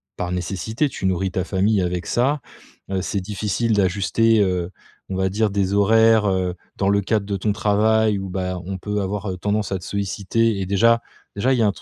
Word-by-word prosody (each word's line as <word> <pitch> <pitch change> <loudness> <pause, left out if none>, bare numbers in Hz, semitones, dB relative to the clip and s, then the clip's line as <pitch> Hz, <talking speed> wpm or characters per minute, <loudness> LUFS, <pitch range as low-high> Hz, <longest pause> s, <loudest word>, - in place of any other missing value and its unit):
par 90 0 -3
nécessité. 100 - -2
Tu 95 - -3
nourris 95 0 0
ta 95 - -1
famille 100 +1 +1
avec 90 0 -2
ça. 135 +5 +1 0.5
Heu, 95 -1 0
c'est 100 +2 -2
difficile 105 +3 -1
d'ajuster, 105 +3 +2
heu, 90 -3 0 0.4
on 95 - -3
va 95 0 +1
dire 105 +2 +1
des 100 -1 0
horaires, 110 +2 +4
heu, 95 -2 0 0.2
dans 100 - +1
le 100 0 +3
cadre 105 +1 0
de 100 0 -2
ton 105 +2 0
travail, 110 +1 +2
où, 95 0 -5
bah, 90 0 -3
on 95 +1 -4
peut 105 +2 -2
avoir 100 0 -3
tendance 105 +2 -1
à 95 - -1
te - - -14
solliciter 100 +2 -1
et - - -2
déjà 115 +4 +3 0.3
déjà 125 +6 +2
il - - +1
y - - +4
a - - +4
un 100 - +1
100 Hz, 210 wpm, -22 LUFS, 95-110 Hz, 0.5 s, horaires